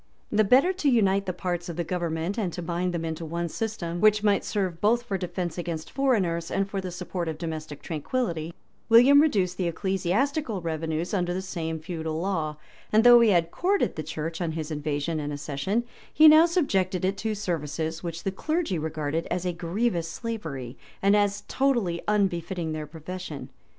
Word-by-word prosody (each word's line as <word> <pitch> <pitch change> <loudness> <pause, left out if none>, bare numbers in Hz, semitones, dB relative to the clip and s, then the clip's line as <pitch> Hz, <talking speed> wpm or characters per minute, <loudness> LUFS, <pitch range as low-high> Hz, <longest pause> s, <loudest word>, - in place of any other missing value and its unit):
2] 210 - -1
The 215 - +6
better 265 - +5
to 330 -6 +1
unite 200 -5 +3
the - - +1
parts 175 -1 -3
of 170 - -5
the 175 - -1
government, 170 +1 -2
and 200 -6 -1
to 175 - -5
bind 175 +2 -1
them 170 -1 -3
into 160 0 -4
one 170 +2 -3
system, 175 -3 -4
which 215 -1 +5
might 205 -1 +3
serve 185 -5 -2
both 235 +3 +3
for 200 - -3
defence 180 -2 -3
against 165 -2 -4
foreigners 190 -12 +1
and 195 0 0
for 200 -1 -3
the 185 - -5
support 180 0 -4
of 160 -1 -3
domestic 155 -3 -6
tranquillity, 165 - -2 0.4
William 255 +5 +8
reduced 190 - +1
the 180 - 0
ecclesiastical 195 - 0
revenues 160 +1 -3
under 180 -2 0
the - - -1
same 165 -4 -4
feudal 160 -1 -4
law; 160 -5 -2 0.3
and 220 +1 +5
though 240 0 +9
he 230 -2 +5
had 170 -3 +2
courted 390 +3 +1
the 155 - -3
church 160 +2 -5
on 165 -2 -1
his 160 -1 -4
invasion 150 +1 -2
and 145 0 -3
accession, 145 +10 -2 0.3
he 310 - +7
now 310 +2 +8
subjected 195 - +1
it 190 +1 +1
to 220 0 -2
services 160 -4 -3
which 170 -1 -5
the 195 - -1
clergy 310 - -1
regarded 155 +1 -2
as 180 +1 -2
a 180 - 0
grievous 175 +1 -1
slavery, 160 - -5 0.3
and 200 +1 +5
as 205 0 +1
totally 235 -11 +1
unbefitting 180 -5 0
their 155 -1 -4
profession. 165 -1 -7
180 Hz, 185 wpm, -26 LUFS, 160-210 Hz, 0.4 s, though